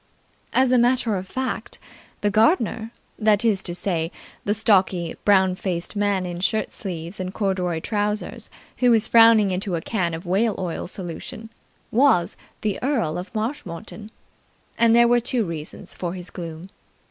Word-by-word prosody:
As 260 Hz, -1 st, +3 dB
a 250 Hz, -, +5 dB
matter 240 Hz, -2 st, +2 dB
of 190 Hz, 0 st, -4 dB
fact, 260 Hz, +5 st, -4 dB, 0.4 s
the 205 Hz, -, +1 dB
gardener 225 Hz, -, +2 dB, 0.3 s
that 215 Hz, 0 st, +3 dB
is 205 Hz, -4 st, +3 dB
to 175 Hz, -2 st, -3 dB
say, 170 Hz, -3 st, -1 dB, 0.3 s
the 205 Hz, -, +2 dB
stocky, 190 Hz, -6 st, +2 dB
brown 190 Hz, -2 st, +4 dB
faced 180 Hz, 0 st, -3 dB
man 200 Hz, -2 st, +1 dB
in 175 Hz, -1 st, -5 dB
shirt 215 Hz, +4 st, 0 dB
sleeves 175 Hz, -2 st, -6 dB
and 185 Hz, 0 st, -3 dB
corduroy 185 Hz, -5 st, -1 dB
trousers 210 Hz, +1 st, -2 dB, 0.3 s
who 250 Hz, -, +3 dB
was 225 Hz, -3 st, +5 dB
frowning 225 Hz, -3 st, +6 dB
into 185 Hz, 0 st, -2 dB
a -, -, -1 dB
can 175 Hz, -4 st, -1 dB
of 165 Hz, +3 st, -8 dB
whale 200 Hz, +4 st, +1 dB
oil 180 Hz, -2 st, -4 dB
solution 190 Hz, +5 st, -7 dB, 0.4 s
was 235 Hz, -8 st, +3 dB, 0.3 s
the 210 Hz, -2 st, -2 dB
Earl 235 Hz, -, 0 dB
of 180 Hz, -, -8 dB
Marshmoreton, 215 Hz, -, -5 dB, 0.7 s
and 230 Hz, 0 st, +4 dB
there 235 Hz, 0 st, +6 dB
were 240 Hz, 0 st, +4 dB
two 240 Hz, -1 st, 0 dB
reasons 160 Hz, -3 st, -7 dB
for 175 Hz, 0 st, -4 dB
his 180 Hz, -1 st, -8 dB
gloom. 170 Hz, +1 st, -7 dB
200 Hz, 160 wpm, -23 LUFS, 180-225 Hz, 0.7 s, frowning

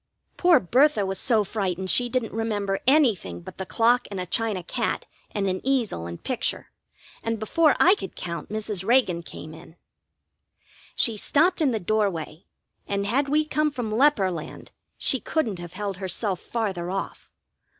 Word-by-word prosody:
Poor 350 Hz, -3 st, +5 dB
Bertha 245 Hz, -, +3 dB
was 190 Hz, 0 st, -3 dB
so 225 Hz, -5 st, +2 dB
frightened 190 Hz, -3 st, -2 dB
she 245 Hz, -1 st, +2 dB
didn't 245 Hz, -2 st, -2 dB
remember 205 Hz, -3 st, -1 dB
anything 225 Hz, -, +3 dB
but 85 Hz, -, -11 dB
the 190 Hz, -, -4 dB
clock 240 Hz, +4 st, +2 dB
and 200 Hz, -2 st, -5 dB
a 180 Hz, -, -3 dB
china 210 Hz, -1 st, -1 dB
cat -, -, -2 dB, 0.2 s
and 200 Hz, -1 st, -2 dB
an 185 Hz, 0 st, -1 dB
easel 240 Hz, -, 0 dB
and 85 Hz, 0 st, -8 dB
picture, -, -, -2 dB, 0.5 s
and 230 Hz, 0 st, -2 dB
before 300 Hz, +8 st, +3 dB
I 365 Hz, -, +7 dB
could 410 Hz, -, -6 dB
count 170 Hz, -3 st, -5 dB
Mrs. 210 Hz, -3 st, -3 dB
Reagan 215 Hz, -6 st, +3 dB
came 155 Hz, -1 st, -10 dB
in. 160 Hz, 0 st, -14 dB, 1.2 s
She 225 Hz, -3 st, +2 dB
stopped 335 Hz, -, +2 dB
in 295 Hz, -, +4 dB
the 225 Hz, -3 st, -1 dB
doorway, 180 Hz, -5 st, -1 dB, 0.4 s
and 200 Hz, 0 st, -1 dB
had 270 Hz, +7 st, +1 dB
we 305 Hz, +2 st, +2 dB
come 305 Hz, 0 st, +1 dB
from 245 Hz, -6 st, -4 dB
leper 225 Hz, -5 st, +3 dB
land 165 Hz, -3 st, -8 dB, 0.3 s
she 265 Hz, -, +2 dB
couldn't 230 Hz, -, -1 dB
have 175 Hz, 0 st, -8 dB
held 200 Hz, -1 st, -4 dB
herself 190 Hz, 0 st, -1 dB
farther 195 Hz, -7 st, -3 dB
off. 195 Hz, +1 st, -5 dB
210 Hz, 165 wpm, -25 LUFS, 185-250 Hz, 1.2 s, I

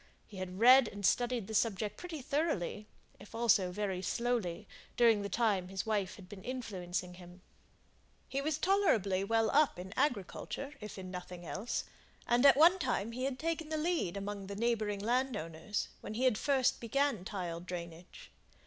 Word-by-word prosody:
He 205 Hz, -, -12 dB
had 185 Hz, 0 st, -5 dB
read 250 Hz, +1 st, +8 dB
and 205 Hz, -1 st, -5 dB
studied 245 Hz, 0 st, +2 dB
the 220 Hz, -, -7 dB
subject 210 Hz, -1 st, 0 dB
pretty 330 Hz, -6 st, -7 dB
thoroughly, 275 Hz, -, -1 dB, 0.3 s
if 205 Hz, +3 st, -12 dB
also 210 Hz, -6 st, +3 dB
very 190 Hz, -1 st, -2 dB
slowly, 230 Hz, -3 st, -1 dB, 0.3 s
during 230 Hz, -3 st, +5 dB
the 200 Hz, -, -4 dB
time 200 Hz, -4 st, +1 dB
his 190 Hz, +2 st, -4 dB
wife 205 Hz, -4 st, -1 dB
had 190 Hz, -3 st, -13 dB
been 190 Hz, 0 st, -10 dB
influencing 185 Hz, -8 st, -4 dB
him. 180 Hz, +1 st, -14 dB, 0.8 s
He 275 Hz, -, -2 dB
was 305 Hz, +1 st, 0 dB
tolerably 225 Hz, -, +2 dB
well 225 Hz, +2 st, +2 dB
up 295 Hz, -6 st, +3 dB
in 185 Hz, +2 st, -7 dB
agriculture, 275 Hz, -, -2 dB
if 210 Hz, -1 st, -8 dB
in 185 Hz, -1 st, -7 dB
nothing 180 Hz, -1 st, -7 dB
else; 200 Hz, +8 st, -3 dB, 0.4 s
and 245 Hz, +3 st, +5 dB
at 275 Hz, -, +7 dB
one 345 Hz, +5 st, +7 dB
time 240 Hz, -, -1 dB
he 255 Hz, +3 st, -3 dB
had 270 Hz, -1 st, -2 dB
taken 325 Hz, 0 st, -2 dB
the 315 Hz, -, -1 dB
lead 305 Hz, -, 0 dB
among 200 Hz, 0 st, -5 dB
the 200 Hz, -, -6 dB
neighbouring 215 Hz, -2 st, 0 dB
landowners, 210 Hz, -6 st, -1 dB
when 215 Hz, -, -7 dB
he 255 Hz, +3 st, +3 dB
first 265 Hz, +3 st, +1 dB
began 240 Hz, -3 st, 0 dB
tile 180 Hz, -4 st, -4 dB
drainage. 175 Hz, -, -8 dB
215 Hz, 165 wpm, -33 LUFS, 185-255 Hz, 0.8 s, read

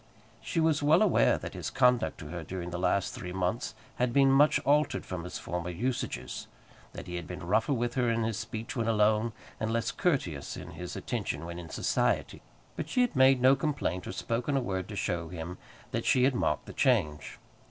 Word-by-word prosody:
She 165 Hz, -, -2 dB
was 160 Hz, -2 st, +3 dB
well 155 Hz, +7 st, +5 dB
aware 205 Hz, -, +4 dB
that -, -, -7 dB
his -, -, -4 dB
conduct 125 Hz, -2 st, +3 dB
to 75 Hz, -, -8 dB
her 85 Hz, 0 st, -5 dB
during 90 Hz, +1 st, -5 dB
the 90 Hz, -, -3 dB
last 95 Hz, +1 st, +1 dB
three 90 Hz, -, -6 dB
months 95 Hz, +5 st, -2 dB, 0.2 s
had 125 Hz, 0 st, +1 dB
been 135 Hz, +1 st, +5 dB
much 145 Hz, +3 st, +5 dB
altered 150 Hz, +2 st, +2 dB
from 90 Hz, -2 st, -5 dB
his 90 Hz, -, -5 dB
former 90 Hz, 0 st, -4 dB
usages; 95 Hz, -, -3 dB, 0.5 s
that -, -, -7 dB
he 90 Hz, 0 st, -5 dB
had 85 Hz, -3 st, -6 dB
been 85 Hz, -, -7 dB
rougher 110 Hz, +9 st, +2 dB
with 120 Hz, -1 st, -1 dB
her 125 Hz, -2 st, +1 dB
in 115 Hz, 0 st, +1 dB
his 110 Hz, -1 st, -1 dB
speech 110 Hz, 0 st, -5 dB
when 115 Hz, -3 st, -1 dB
alone, 110 Hz, +1 st, +3 dB, 0.3 s
and 110 Hz, 0 st, -1 dB
less 115 Hz, 0 st, 0 dB
courteous 125 Hz, -, -1 dB
in -, -, -8 dB
his 90 Hz, 0 st, -7 dB
attention -, -, -3 dB
when 85 Hz, +1 st, -6 dB
in 85 Hz, -2 st, -9 dB
society; -, -, 0 dB, 0.3 s
but -, -, -4 dB
she 250 Hz, -, +2 dB
had 245 Hz, -8 st, +1 dB
made 130 Hz, -1 st, +5 dB
no 130 Hz, +1 st, +7 dB
complaint 135 Hz, -, -2 dB
or -, -, -3 dB
spoken 120 Hz, +5 st, -1 dB
a -, -, +3 dB
word 95 Hz, -6 st, -3 dB
to 105 Hz, -, -7 dB
show 85 Hz, -4 st, -2 dB
him 90 Hz, +1 st, -6 dB, 0.3 s
that -, -, -2 dB
she 125 Hz, -, +4 dB
had 135 Hz, +1 st, +4 dB
marked 125 Hz, -, 0 dB
the -, -, -9 dB
change. 90 Hz, -, +1 dB
115 Hz, 210 wpm, -30 LUFS, 90-130 Hz, 0.5 s, no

